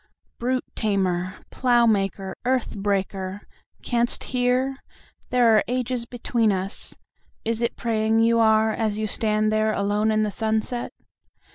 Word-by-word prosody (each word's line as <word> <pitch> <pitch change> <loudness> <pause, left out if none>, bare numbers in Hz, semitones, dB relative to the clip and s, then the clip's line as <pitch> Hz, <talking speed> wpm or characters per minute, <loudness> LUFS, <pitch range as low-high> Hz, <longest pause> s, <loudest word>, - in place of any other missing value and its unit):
"Brute 255 +2 -1
tamer, 185 -4 0 0.2
plough 240 -2 +3
maker, 195 -3 0
earth 255 -1 0
breaker! 195 -1 -2 0.4
Can'st 240 -1 0
hear? 255 +2 0 0.5
There 240 -3 +4
are 215 - +4
ages 250 -1 -2
between 235 -2 0
us."Is 200 +3 -5
it 235 0 0
praying 225 -1 +1
you 230 0 +4
are 220 0 +4
as 215 -1 -1
you 215 - -1
stand 215 0 +1
there 215 0 +2
alone 205 +2 +1
in 215 0 +2
the 210 - -1
sunset? 220 +3 -2
220 Hz, 130 wpm, -24 LUFS, 205-240 Hz, 0.5 s, There